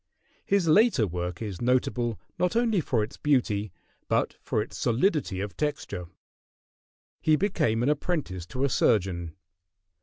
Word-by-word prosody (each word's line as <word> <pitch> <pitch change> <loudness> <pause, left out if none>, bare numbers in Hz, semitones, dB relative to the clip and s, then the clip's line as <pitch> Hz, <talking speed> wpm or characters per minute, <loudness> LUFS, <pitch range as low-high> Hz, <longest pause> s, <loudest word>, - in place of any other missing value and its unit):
] - - -37
His 195 -4 +3
later 180 - +5
work 90 +1 -4
is 100 -5 -5
notable 120 -3 +1 0.2
not 180 +4 +1
only 230 -5 +2
for 120 -7 0
its 110 - -7
beauty, 110 -8 +1 0.4
but - - +1
for - - -1
its - - -4
solidity 125 - +1
of 100 0 -5
texture. 145 - -3 1.1
He 155 - +4
became 155 - +1
an 130 - +2
apprentice 145 - -2
to 130 +9 -3
a 140 - +3
surgeon. 90 -9 +1
120 Hz, 145 wpm, -27 LUFS, 100-155 Hz, 1.1 s, later